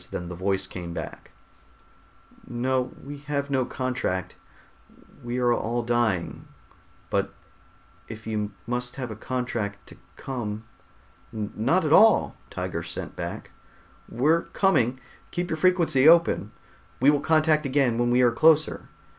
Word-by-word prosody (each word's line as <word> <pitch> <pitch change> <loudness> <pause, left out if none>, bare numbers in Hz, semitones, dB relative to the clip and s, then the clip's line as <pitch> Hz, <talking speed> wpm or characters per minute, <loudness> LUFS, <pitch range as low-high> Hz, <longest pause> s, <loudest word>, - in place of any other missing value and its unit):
Then 90 -1 -5
the 90 - -6
voice 95 +2 0
came 85 -2 -7
back, - - -7 1.2
"No, 125 +1 -1
we 145 +1 -8
have 140 -1 -3
no 130 -2 +1
contract. 125 -10 -3 0.9
We 120 +1 -3
are 120 -1 +3
all 120 +1 -1
dying, 115 -7 -1 0.6
but - - -1 0.7
if 110 0 -9
you 105 -2 -2
must 125 +1 -3
have 130 -4 -5
a - - -6
contract 115 -4 -4
to - - -14 0.2
come...." 110 -5 -5 0.7
"Not 110 - 0
at 155 - +2
all," 220 +4 +6
Tiger - - -4
sent - - -6
back. - - -6 0.6
"We're 155 +7 +2
coming. 130 - +1 0.3
Keep 175 +1 -3
your 160 - -1
frequency 165 -5 +4
open. 165 -11 +4 0.5
We 135 +3 +6
will 145 -1 +1
contact 155 -1 +3
again 130 -4 +2
when 120 0 +2
we 125 +1 +4
are 120 - +5
closer." 155 +4 +3
125 Hz, 135 wpm, -25 LUFS, 110-145 Hz, 1.2 s, all